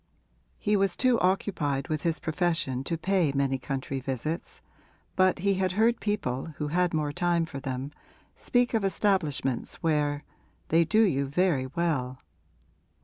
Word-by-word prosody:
He 210 0 +1
was 195 -3 +1
too 255 -2 +3
occupied 170 -8 0
with 155 -2 -2
his 165 -1 0
profession 160 -6 -1
to 165 - -1
pay 180 -3 +1
many 135 -1 0
country 135 0 -3
visits, 135 +5 -4 0.6
but 185 0 +3
he 195 +2 +1
had 185 -1 0
heard 225 +4 +3
people 160 - -2
who 150 -1 -2
had 175 +2 +1
more 150 -2 0
time 170 +2 +1
for 140 -4 -7
them 130 +1 -4 0.4
speak 245 0 +1
of 225 -3 +1
establishments 185 - 0
where 150 -2 +1 0.5
'they 165 +1 +4
do 215 +8 +4
you 140 -9 +1
very 150 -3 +1
well.' 130 -4 -1
165 Hz, 145 wpm, -28 LUFS, 140-185 Hz, 0.6 s, they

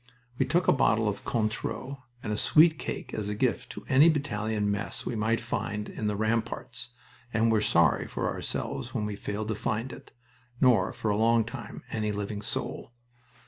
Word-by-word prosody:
We - - +2
took 175 +6 +2
a - - +7
bottle 115 -5 +3
of 105 - -2
Cointreau 120 +4 -2 0.2
and 105 - -2
a - - 0
sweet 160 +8 +5
cake - - -5
as 105 -1 -2
a 105 - -2
gift 125 +2 0
to - - -9
any 140 +5 +7
battalion 110 -8 0
mess 100 -1 -3
we 120 - -2
might 110 +2 +1
find 105 -2 -3
in 110 - -3
the 105 - 0
ramparts, 115 +2 -2 0.4
and 115 0 +3
were 110 -2 +3
sorry 85 -7 +3
for - - -2
ourselves - - -3
when 105 - 0
we 105 -1 -3
failed 105 +1 -4
to - - +1
find 110 +4 -2
it, - - -12 0.5
nor, 125 -3 +4
for 110 - -2
a 100 - +1
long 115 0 +4
time, 120 -2 -8
any 105 -1 -1
living 105 0 -3
soul. 115 - -4
110 Hz, 185 wpm, -28 LUFS, 105-125 Hz, 0.5 s, a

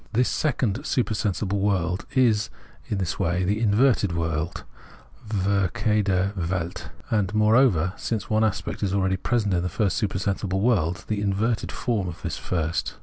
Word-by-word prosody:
This 125 +3 +2
second 125 -8 0
supersensible 105 -4 0
world 95 -2 0
is 115 -4 +3 0.4
in 110 -5 -2
this 95 -1 -2
way 90 +2 +1
the 105 +4 0
inverted 110 -3 +3
world 80 0 -2 0.7
{verkehrte 100 0 +1
Welt), 90 -1 -3 0.2
and, 105 -3 +1
moreover, 105 -5 +4
since 110 -3 -3
one 110 0 +2
aspect 110 -2 -2
is 100 -2 0
abeady 95 -1 +1
present 110 -5 +1
in 85 - +1
the 90 - -2
first 100 +3 0
supersensible 95 -1 -1
world, 100 -4 +1
the 105 -2 -1
inverted 105 +3 0
form 110 -7 -1
of 85 - -8
this - - -3
first. 85 -2 -2
100 Hz, 145 wpm, -25 LUFS, 90-110 Hz, 0.7 s, moreover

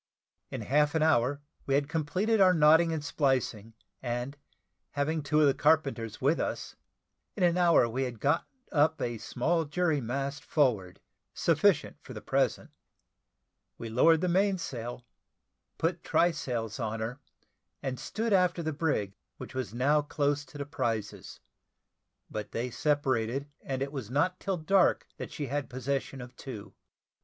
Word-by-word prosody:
In - - -5
half 150 +2 +2
an 160 - +3
hour, 140 -2 +2 0.3
we 135 - +2
had 140 0 +1
completed 180 +8 +1
our 185 -1 +6
knotting 160 +2 +5
and 155 -2 -3
splicing, 125 -7 0 0.3
and 120 +2 -3 0.6
having 150 +2 0
two 150 +2 +2
of - - +6
the 140 - +5
carpenters 135 -8 +1
with 145 +5 +2
us, - - -3 0.6
in 195 - -1
an 175 -1 +4
hour 170 -8 +5
we 120 +3 -3
had 125 -4 -3
got 145 +7 +1 0.2
up 155 0 +3
a 120 -2 -2
small 165 +10 0
jury 155 -1 0
mast 140 +4 -3
forward, 110 - +1 0.4
sufficient - - +2
for - - -10
the - - -5
present. - - 0 1.1
We 115 - -6
lowered 160 +8 +4
the 180 - +1
mainsail, 165 - -1 0.7
put 165 +1 -1
try 175 +1 +3
sails 120 -7 -4
on 110 -1 -2
her, 120 +5 -4 0.6
and 130 -2 -3
stood 225 0 -2
after 180 -2 +3
the 155 0 -2
brig, 140 -11 -1 0.2
which - - -9
was 130 -7 -3
now 140 +6 +2
close 145 0 0
to 145 - -12
the 140 - -4
prizes: 115 -7 -3 0.9
but 105 -1 -6
they 120 +2 -2
separated, 135 -2 0
and 135 0 -2
it 140 - -5
was 130 -7 -6
not 165 +8 +1
till 195 -2 -2
dark 185 +4 +3
that - - -6
she 150 - -4
had 140 +1 -3
possession 130 +1 -3
of 125 +1 -10
two. 120 -6 -8
145 Hz, 155 wpm, -29 LUFS, 125-160 Hz, 1.1 s, our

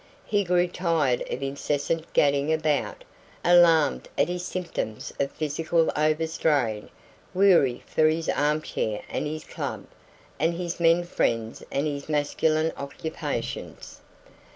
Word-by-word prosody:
He 205 -1 +1
grew 180 -1 +2
tired 165 -8 0
of 135 - -4
incessant 145 +4 -2
gadding 140 +1 +3
about, 155 -2 0 0.4
alarmed 170 -4 +5
at - - +2
his 180 0 -3
symptoms 170 -12 -4
of 140 - +1
physical 160 +3 0
overstrain, 150 -7 0 0.5
weary 175 -10 +4
for 155 - +2
his 160 +1 0
arm 150 +2 +1
chair 105 -1 -3
and - - -2
his 155 +1 -5
club, - - -5 0.5
and 165 +3 +1
his 175 0 -4
men 170 +1 +4
friends 115 -9 -1
and 140 - 0
his 145 -1 -4
masculine 155 +2 +1
occupations. 140 +3 -5
155 Hz, 125 wpm, -26 LUFS, 140-170 Hz, 0.5 s, alarmed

